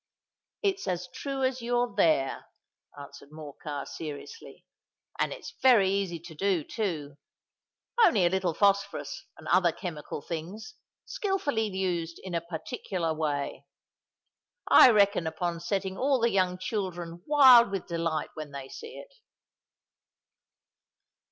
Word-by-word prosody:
"It's 390 - 0
as 180 -1 -2
true 275 +3 -4
as 260 -1 0
you're 240 0 0
there," 140 -5 +1 0.5
answered 140 0 -12
Morcar, 150 -1 -7
seriously; 155 - -9 0.5
"and - - +1
it's 470 - -8
very 225 -8 +5
easy 195 -4 -1
to 170 -1 -11
do, 185 0 0
too:—only 180 - -2
a - - +4
little 185 -3 0
phosphorus 200 0 0
and - - -12
other 180 -2 +4
chemical 155 -4 -6
things, 175 - -6 0.3
skilfully 295 - -1
used 180 -4 -2
in 185 -2 -7
a 170 - 0
particular 170 0 -4
way. 150 -3 -3 1.0
I - - +9
reckon 200 -6 +3
upon 170 +1 -3
setting 190 +2 -3
all 270 0 +2
the 235 0 +2
young 185 -2 +1
children 175 -4 -4
wild 260 -6 +8
with 195 -2 -4
delight 165 -2 -2
when 155 -1 -7
they 135 -1 -8
see 460 +1 -9
it." - - -12
185 Hz, 125 wpm, -28 LUFS, 160-225 Hz, 1.0 s, I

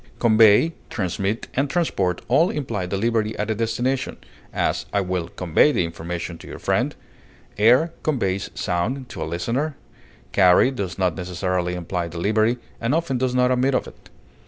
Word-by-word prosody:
Convey, 110 +6 +5 0.2
transmit, 100 +2 -2
and 135 +2 0
transport 100 - 0
all 155 +9 +4
imply 115 - -3
delivery 110 +3 0
at 105 +1 -1
a - - +2
destination; 115 +4 -1 0.3
as, - - -1
I 100 - +1
will 90 -2 -2
convey 90 - +2
the 90 - +1
information 85 +1 -5
to - - -12
your - - -8
friend; - - 0 0.6
air 125 +10 +4
conveys 100 -10 -1
sound 115 +9 -2
(to 80 - -7
a - - -1
listener); 120 - -2 0.5
carry 95 +6 +5
does 95 -9 -4
not 90 -3 +1
necessarily 90 0 -2
imply 90 0 -3
delivery, 110 +8 +1 0.2
and 115 +5 0
often 150 -6 -1
does 130 0 0
not 125 0 +3
admit 130 +1 +2
of - - 0
it. - - -15
110 Hz, 160 wpm, -23 LUFS, 90-125 Hz, 0.6 s, Convey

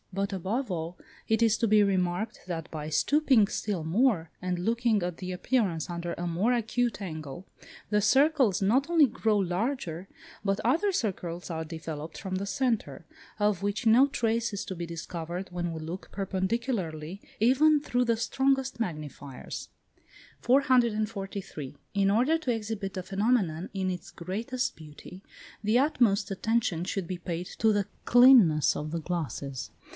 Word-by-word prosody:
But, 195 +1 -2
above 200 +6 -2
all, 170 0 -4 0.3
it 220 0 +2
is 225 -1 +4
to 230 - +2
be 210 0 +5
remarked 190 +2 -1
that 165 -2 -4
by 155 -1 -5
stooping 260 - +3
still 200 -5 -3
more, 175 - +2
and 180 -1 -1
looking 225 +2 +1
at 175 -1 -3
the 185 -1 -5
appearance 180 -4 0
under 170 0 -4
a 175 - -4
more 180 +8 +1
acute 240 0 -1
angle, 155 -2 -6 0.5
the 210 0 +3
circles 265 - +3
not 260 +10 +2
only 330 -3 +6
grow 220 -3 0
larger 185 - -2 0.3
but 195 -1 0
other 335 - +2
circles 180 - -3
are 160 -1 -3
developed 160 -1 -7
from 190 -1 -4
the 195 +2 -2
centre, 220 - -1 0.3
of 205 -3 +1
which 205 +4 -2
no 240 +5 +6
trace 230 -3 0
is 200 - -4
to 190 - -5
be 170 0 -4
discovered 170 +2 -5
when 175 -1 -3
we 160 - -5
look 165 +4 -7
perpendicularly, 190 - -2 0.2
even 285 +7 +5
through 250 -3 0
the 230 -1 +1
strongest 265 +2 0
magnifiers. 150 - -6 0.7
443. 215 - 0 0.2
In 200 -1 +2
order 255 +10 +3
to 270 -6 -1
exhibit 210 -3 -4
the 185 - -3
phenomenon 195 -5 0
in 190 -1 -1
its 180 0 -6
greatest 225 +9 -3
beauty, 160 +4 -12 0.4
the 215 +3 +3
utmost 235 -9 +2
attention 195 -4 0
should 185 -1 -3
be 180 -1 -4
paid 175 0 -4
to 220 0 +4
the 205 -2 0 0.2
cleanness 240 - +6
of 150 +1 -4
the 170 - -2
glasses. 145 -6 -4
195 Hz, 155 wpm, -28 LUFS, 175-235 Hz, 0.7 s, only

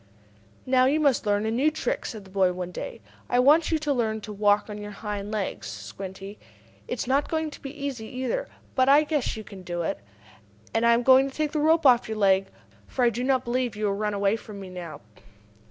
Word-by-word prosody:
"Now 255 0 +4
you 285 +4 +3
must 280 -7 +2
learn 205 +1 +2
a 220 - 0
new 265 +7 +3
trick," 310 - -3
said 215 -3 -7
the 190 - -16
boy 190 -2 +2
one 180 0 -5
day. - - -7 0.3
"I 245 - +2
want 295 +6 +5
you 320 - +3
to 300 -2 -1
learn 225 -4 0
how - - -5
to 210 0 -7
walk 205 0 +2
on 210 -1 -7
your 205 0 -6
hind 205 0 -5
legs, 210 -3 -3
Squinty. 195 +1 -8 0.5
It 245 - -3
is - - -2
not 275 +3 +1
going 315 -1 -1
to - - -12
be 275 - -6
easy, 275 -6 -5
either. 260 - -3 0.3
But 260 0 +3
I 290 +2 +7
guess 295 -7 -1
you 215 - -6
can 195 -2 -11
do 175 -1 -4
it. 160 - -2 0.7
And 225 +1 +2
I 235 - +6
am 240 - 0
going 265 +2 +6
to 265 - -14
take 305 -1 0
the 305 - -1
rope 315 +1 +3
off 245 -4 +5
your 220 - -3
leg, 195 -2 +3 0.4
for 250 - 0
I 235 - +4
do 240 +3 -3
not 260 -1 +1
believe 240 -1 -1
you 215 0 -2
will 200 - +1
run 210 +1 -2
away 200 +2 +1
from 210 -3 -10
me 190 -2 -9
now." 175 -3 -8
235 Hz, 240 wpm, -26 LUFS, 205-275 Hz, 0.7 s, I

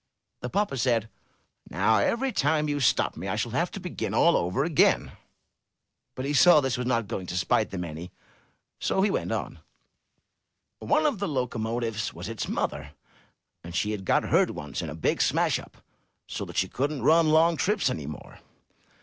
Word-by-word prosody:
The 125 - -5
papa 200 -6 -1
said, 115 -3 +1 0.6
"Now 105 +5 +2
every 250 - 0
time 150 - +1
you 145 -1 -1
stop 130 - +2
me 90 +4 -6
I 95 - -1
shall 115 +2 -2
have 170 +9 0
to - - -7
begin 180 -1 -4
all 170 - +5
over 90 +11 0
again." 155 -2 +2 1.0
But 130 - -4
he 145 - -1
saw 175 +4 +7
that 150 - +6
this 130 - 0
was 125 - -2
not 115 -4 0
going 95 -4 -5
to 90 - -4
spite 100 +4 +1
them 90 -2 -4
any, 85 +1 -7 0.7
so 190 - +1
he 205 - +2
went - - -2
on: - - -4 1.2
"One 305 +1 +1
of 280 -9 +1
the 200 - -1
locomotives 115 - -2
was 90 +5 -6
its 115 - -4
mother, - - -3 0.7
and 85 +1 -8
she 105 +4 0
had 105 -2 -4
got - - +2
hurt - - +3
once 75 -1 -5
in - - -5
a 75 - -6
big 80 - 0
smash - - +2
up, - - -14 0.5
so - - -5
that - - -9
she - - +2
couldn't 140 -1 -2
run 160 +3 +5
long 165 +2 +4
trips 205 +3 +1
any 80 - -3
more. 75 - -9
125 Hz, 190 wpm, -27 LUFS, 100-160 Hz, 1.2 s, saw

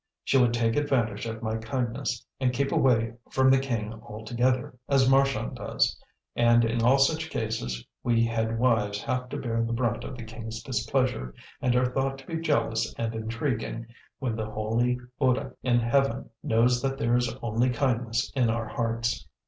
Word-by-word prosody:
She 135 - +3
would 120 -2 +4
take 115 -1 +1
advantage 120 -8 0
of 115 0 -6
my 110 0 -1
kindness, 120 +2 -3
and 130 -2 +2
keep 140 +3 -1
away 115 -3 +3 0.2
from 130 0 +4
the 135 - +5
king 115 -5 -2
altogether, 120 +3 -1 0.2
as 135 -2 +4
Marchand 135 - +2
does; - - 0 0.4
and 120 0 +5
in 115 +1 0
all 125 +4 +5
such 155 +3 +2
cases 65 - -3 0.2
we 115 -1 +3
head 115 0 -1
wives 110 -4 +1
have 125 0 -2
to - - -4
bear 115 -2 -1
the 115 0 -2
brunt 115 -1 0
of 130 - -7
the 120 - -7
king's 110 0 -7
displeasure, 125 - -1 0.3
and 125 -1 +2
are 125 0 +2
thought 135 0 0
to 135 - -13
be 165 - -3
jealous 115 -8 +1
and 115 -1 -2
intriguing, 115 +1 -3 0.3
when 125 -4 -2
the 110 -1 -3
holy 115 +3 0 0.2
Buddh 130 -1 +1
in 120 -2 +3
heaven 120 0 +1
knows 120 +2 +3
that 135 0 -1
there 120 0 +2
is 125 -1 +1
only 115 +2 +1
kindness 120 -2 0
in 125 -4 +3
our 115 0 -1
hearts." 115 0 -1
120 Hz, 175 wpm, -27 LUFS, 115-130 Hz, 0.4 s, the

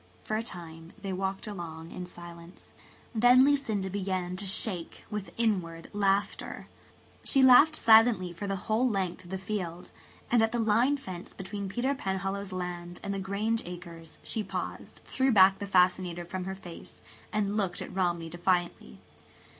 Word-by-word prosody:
For 215 - -2
a 220 - 0
time 165 -5 -9
they 195 -2 -4
walked 190 +2 -3
along 170 -5 -7
in 180 - -6
silence. 175 0 -12 0.4
Then 245 +3 +6
Lucinda 250 -9 +1
began 185 -2 -2
to 200 +1 -1
shake 185 -3 +1
with 210 -2 -4
inward 180 -8 -1
laughter. 200 0 0 0.6
She 270 - +4
laughed 260 +5 +8
silently 220 - +5
for 190 +4 -5
the 195 - -1
whole 230 +4 +2
length 190 -4 -2
of - - -13
the 190 - -3
field; 185 -3 -5 0.4
and 240 -1 +5
at 225 0 +2
the - - +1
line 230 +5 +3
fence 185 -9 -8
between 200 0 -5
Peter 245 +7 0
Penhallow's 195 -3 -3
land 175 -1 -5
and 200 -1 -2
the 195 - -3
Grange 205 +4 -1
acres 170 -2 -9
she 220 - -1
paused, - - -6
threw 265 0 +1
back 195 -2 +6
the 200 - -4
fascinator 180 -2 +2
from 185 +1 -5
her 190 0 -4
face, 175 -3 -11 0.3
and 205 -1 0
looked 195 -4 -1
at - - -7
Romney 175 -3 0
defiantly. 175 - -1
190 Hz, 160 wpm, -29 LUFS, 175-215 Hz, 0.6 s, laughed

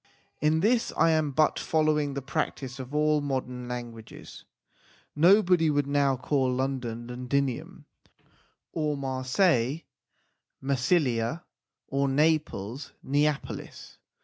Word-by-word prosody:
In 155 +2 +2
this 230 +4 +2
I 165 - +4
am 155 -2 +1
but 150 +3 +2
following 150 -3 +1
the 140 - -4
practice 135 -3 -3
of 130 +2 -7
all 150 0 +2
modern 125 -3 -3
languages. 120 -2 -8 0.7
Nobody 175 0 +5
would 145 -1 +1
now 140 -2 +1
call 130 0 0
London 125 -3 -3
Londinium, 125 +1 -3 0.9
or 150 -2 -1
Marseilles 130 +2 +1 0.8
Massilia, 135 +1 0 0.4
or 140 +1 0
Naples 140 -5 0
Neapolis. 145 +1 -2
140 Hz, 100 wpm, -27 LUFS, 130-155 Hz, 0.9 s, Nobody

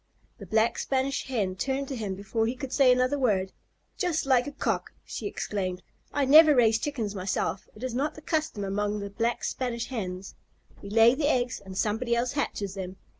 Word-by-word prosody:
The 200 - -9
Black 220 +4 +2
Spanish 270 0 -1
Hen 205 -8 -1
turned 270 +8 -2
to 270 - -3
him 205 -5 -3
before 205 +3 -1
he 240 - -2
could 265 0 -6
say 270 -3 +6
another 255 +3 +2
word. 195 -7 +1 0.5
"Just 345 -5 0
like 255 -2 +3
a - - -4
Cock!" - - -2
she - - -5
exclaimed. 185 -3 -3 0.3
"I 285 -1 +1
never 305 +2 +8
raise 225 -3 +4
Chickens 230 -8 -3
myself. 190 0 -2
It 215 - -11
is 255 -2 -2
not 280 +5 -1
the 310 - -10
custom 310 -11 -1
among 205 +1 -1
the 200 0 -6
Black 230 +3 -1
Spanish 240 -2 -2
Hens. 190 -6 -5 0.5
We 200 - -8
lay 225 +3 +6
the 290 +2 +1
eggs 250 -4 0
and 190 -1 -8
somebody 225 +4 0
else 240 +1 0
hatches 205 -9 -2
them. 190 -1 -6
235 Hz, 195 wpm, -27 LUFS, 200-265 Hz, 0.5 s, never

